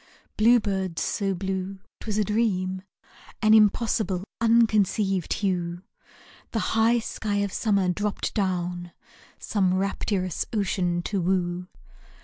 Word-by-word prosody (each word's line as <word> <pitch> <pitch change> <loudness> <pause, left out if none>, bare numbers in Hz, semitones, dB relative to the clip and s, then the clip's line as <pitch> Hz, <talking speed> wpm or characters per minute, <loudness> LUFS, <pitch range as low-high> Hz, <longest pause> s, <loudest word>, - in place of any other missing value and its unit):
Blue 235 +3 +5
birds 190 -5 -2
so 195 -2 -1
blue, 190 +1 -3 0.2
't - - -12
was 210 -1 -1
a 215 - +3
dream, 190 -3 0 0.6
An 215 0 +6
impossible, 210 -3 +3 0.2
unconceived 215 -5 +2
hue, 175 -3 -1 0.7
The - - 0 0.2
high 225 +2 +4
sky 220 -2 -3
of 200 -1 -1
summer 200 -4 +1
dropped 205 +3 -2
down 180 -3 -2 0.4
Some 190 -3 0
rapturous 190 -2 -1
ocean 180 -4 0
to 195 0 -1
woo. 180 0 -1
195 Hz, 120 wpm, -25 LUFS, 185-215 Hz, 0.7 s, An